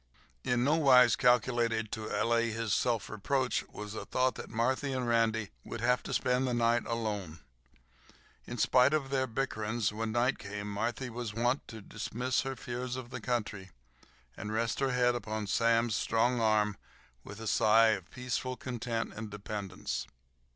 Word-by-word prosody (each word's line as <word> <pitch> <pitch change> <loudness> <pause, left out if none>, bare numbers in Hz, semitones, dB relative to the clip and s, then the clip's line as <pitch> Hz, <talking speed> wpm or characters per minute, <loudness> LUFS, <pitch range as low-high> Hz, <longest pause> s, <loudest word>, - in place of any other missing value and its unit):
In 120 0 +1
nowise 135 -5 +6
calculated 120 -3 +2
to 110 -1 -4
allay 115 +2 +1
his 115 -2 -1
self 120 -4 +1
reproach 130 +5 0
was 105 0 -7
the 110 - -5
thought 130 0 +1
that - - -8
Marthy 130 +4 0
and 130 -2 -2
Randy 115 -2 +1
would 115 - -6
have 125 +1 +2
to - - -9
pass 125 0 +1
the 125 -2 0
night 120 0 +2
alone. 105 -8 -3 1.1
In 120 - -5
spite 130 +5 +4
of 135 -3 -2
their 130 -1 +1
bickerings, 110 -3 -1
when 110 +1 -2
night 125 +3 +1
came 100 0 -6
Marthy 120 +5 -2
was 115 -2 -5
wont 120 +4 0
to 110 -1 -9
dismiss 125 +6 -2
her 135 0 -4
fears 125 0 -4
of 130 -1 -7
the 125 - -6
country, 105 -5 -2 0.7
and 105 - -6
rest 115 +1 -1
her 135 -1 +1
head 125 -1 +3
upon 110 -2 -3
Sam's 115 +1 +2
strong 120 +1 +1
arm 105 -2 +2 0.5
with 105 +1 -10
a 115 - -7
sigh 110 +1 +5
of 95 -5 -1
peaceful 125 0 -3
content 120 -2 -3
and 110 0 -6
dependence. 100 -2 -5
115 Hz, 165 wpm, -31 LUFS, 110-125 Hz, 1.1 s, nowise